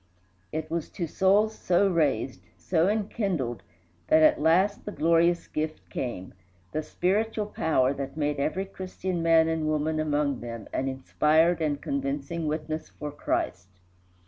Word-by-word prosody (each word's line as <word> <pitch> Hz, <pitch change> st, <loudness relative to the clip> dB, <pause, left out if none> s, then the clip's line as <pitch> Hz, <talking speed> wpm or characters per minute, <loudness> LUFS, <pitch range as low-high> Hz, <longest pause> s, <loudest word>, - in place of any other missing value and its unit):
It 155 Hz, 0 st, -4 dB
was 170 Hz, -2 st, -2 dB
to 175 Hz, -, -2 dB
souls 200 Hz, +6 st, +3 dB
so 185 Hz, +3 st, +2 dB
raised, 150 Hz, -7 st, 0 dB, 0.2 s
so 170 Hz, -1 st, +1 dB
enkindled, 195 Hz, -, -1 dB, 0.5 s
that 155 Hz, 0 st, +5 dB
at 155 Hz, -, +5 dB
last 185 Hz, +6 st, +3 dB
the 210 Hz, -, -5 dB
glorious 170 Hz, 0 st, +2 dB
gift 155 Hz, 0 st, -4 dB
came 95 Hz, -8 st, -4 dB, 0.4 s
the 155 Hz, -, -1 dB
spiritual 210 Hz, +7 st, 0 dB
power 145 Hz, -9 st, +1 dB
that 140 Hz, +1 st, -6 dB
made 145 Hz, -1 st, 0 dB
every 185 Hz, +7 st, -1 dB
Christian 185 Hz, -2 st, -4 dB
man 165 Hz, -1 st, +5 dB
and 160 Hz, -1 st, -1 dB
woman 155 Hz, +1 st, 0 dB
among 145 Hz, -3 st, 0 dB
them 115 Hz, -2 st, -7 dB
an 135 Hz, -, -1 dB
inspired 155 Hz, +5 st, +2 dB
and 145 Hz, -2 st, 0 dB
convincing 140 Hz, +4 st, -3 dB
witness 155 Hz, +1 st, -3 dB
for 150 Hz, 0 st, -7 dB
Christ. 95 Hz, -9 st, -2 dB
160 Hz, 145 wpm, -27 LUFS, 145-175 Hz, 0.5 s, that